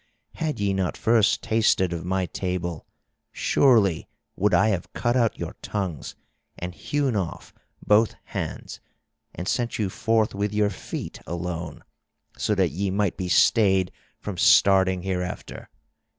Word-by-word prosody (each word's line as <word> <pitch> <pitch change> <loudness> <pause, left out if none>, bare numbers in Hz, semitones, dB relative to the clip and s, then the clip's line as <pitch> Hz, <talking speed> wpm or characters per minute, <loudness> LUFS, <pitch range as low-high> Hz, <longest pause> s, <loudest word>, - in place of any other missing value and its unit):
Had 155 -6 -3
ye 100 -1 +1
not 95 -2 -1
first 110 -2 +3
tasted 110 -5 +2
of 85 -1 -4
my 95 +1 0
table, 90 -3 -4 0.4
surely 105 - +3 0.3
would 105 +2 +1
I 110 +2 +4
have 95 -4 -2
cut 120 +1 0
out 115 -3 +2
your - - -5
tongues 95 -8 -4 0.4
and 90 +1 -5
hewn 140 +3 -1
off 95 -5 -4 0.3
both 105 +2 +4
hands - - -6 0.6
and 90 +2 -5
sent 120 +2 -1
you 100 -4 -1
forth 110 +1 +1
with 100 +1 -2
your 105 -1 +2
feet 95 - -7
alone, 85 0 -5 0.5
so - - 0
that - - +2
ye 100 +4 -2
might 100 -1 0
be 90 -2 -4
stayed 95 -3 +4 0.3
from 100 -4 -6
starting 95 -2 +5
hereafter. 90 -1 -4
95 Hz, 140 wpm, -25 LUFS, 90-110 Hz, 0.6 s, starting